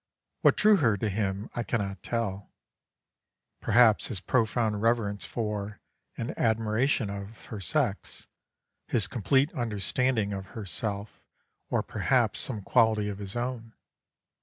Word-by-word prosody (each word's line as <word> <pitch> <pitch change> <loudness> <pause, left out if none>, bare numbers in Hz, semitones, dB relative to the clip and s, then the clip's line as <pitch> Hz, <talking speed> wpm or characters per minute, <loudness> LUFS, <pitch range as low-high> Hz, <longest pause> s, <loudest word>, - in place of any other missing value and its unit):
What - - +5
drew 210 -1 +6
her 115 - +2
to 105 +2 -1
him 100 0 -2
I 120 - -2
cannot 100 -4 -2
tell; 100 -4 -3 1.1
perhaps 115 -1 +4
his 110 -7 -3
profound 110 0 +1
reverence 115 -3 +1
for, 105 -2 -4 0.4
and 115 - -4
admiration 110 +1 +1
of, 100 +2 -8
her 110 - -7
sex, 95 - -1 0.6
his 110 -5 +2
complete 130 - +1
understanding 115 -1 0
of 95 -1 -5
herself, 100 +1 -3 0.5
or - - +1
perhaps - - +1
some 110 -6 -2
quality 110 0 +3
of 100 -1 -6
his 100 +1 -6
own. 120 -2 -4
110 Hz, 125 wpm, -28 LUFS, 100-120 Hz, 1.1 s, drew